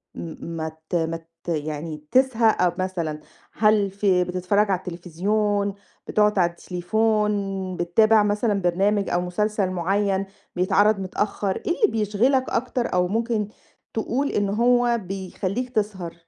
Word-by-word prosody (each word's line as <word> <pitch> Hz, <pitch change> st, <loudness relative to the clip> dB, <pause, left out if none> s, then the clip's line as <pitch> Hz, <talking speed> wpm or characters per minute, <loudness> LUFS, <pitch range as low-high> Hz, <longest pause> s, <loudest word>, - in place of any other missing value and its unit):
م 165 Hz, 0 st, -7 dB
مت 160 Hz, +1 st, -5 dB
مت 165 Hz, 0 st, -2 dB, 0.2 s
يعني 155 Hz, -1 st, -3 dB
تسهَى 255 Hz, -3 st, +3 dB
أ 180 Hz, -1 st, +2 dB
مثلًا 170 Hz, -5 st, -2 dB, 0.3 s
هل 210 Hz, -2 st, +3 dB
في 195 Hz, -2 st, +2 dB
بتتفرّج 185 Hz, +3 st, +1 dB
على 190 Hz, -, +2 dB
التليفزيون، 200 Hz, +4 st, -1 dB, 0.3 s
بتقعُد 210 Hz, -1 st, +2 dB
على 175 Hz, -1 st, +4 dB
التليفون، 210 Hz, +5 st, 0 dB, 0.4 s
بتتابع 215 Hz, +5 st, +4 dB
مثلًا 205 Hz, 0 st, +1 dB
برنامج 195 Hz, +3 st, +1 dB
أو 175 Hz, -, +1 dB
مسلسل 195 Hz, +2 st, 0 dB
معيّن 195 Hz, +2 st, 0 dB, 0.3 s
بيتعرض 200 Hz, +3 st, +3 dB
متأخّر؟ 195 Hz, +1 st, -2 dB
إيه -, -, -3 dB
اللي 425 Hz, -, +6 dB
بيشغلك 225 Hz, +6 st, +2 dB
أكتر 245 Hz, 0 st, -1 dB
أو 180 Hz, 0 st, +2 dB
ممكن 225 Hz, +1 st, -1 dB, 0.5 s
تقول 255 Hz, +5 st, -1 dB
إن 205 Hz, -1 st, 0 dB
هو 240 Hz, +2 st, +3 dB
بيخلّيك 195 Hz, +5 st, -4 dB
تسهر؟ 205 Hz, -7 st, -2 dB
200 Hz, 125 wpm, -24 LUFS, 180-215 Hz, 0.5 s, اللي